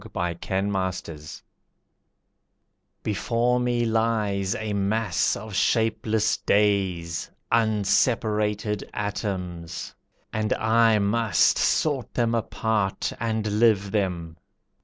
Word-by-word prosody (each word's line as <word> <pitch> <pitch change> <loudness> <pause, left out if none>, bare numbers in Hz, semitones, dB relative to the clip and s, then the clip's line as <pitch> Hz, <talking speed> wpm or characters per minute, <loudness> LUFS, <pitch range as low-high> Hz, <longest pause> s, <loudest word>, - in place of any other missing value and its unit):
A - - -11
Blockhead 90 -2 -3 1.7
Before 115 +4 +1
me 120 -1 +1
lies 110 -4 0
a 110 -1 -3
mass 100 - +1
of 110 0 -8
shapeless 110 +1 +1
days, 95 -5 0 0.2
Unseparated 105 -1 +1
atoms, 90 -5 -4 0.4
and 110 -1 0
I 110 0 +3
must 105 -3 +2
Sort 145 -5 0
them 115 -1 +1
apart 110 -3 -1
and 110 -2 -1
live 105 -4 +3
them. 90 -5 -2
105 Hz, 85 wpm, -25 LUFS, 95-110 Hz, 1.7 s, I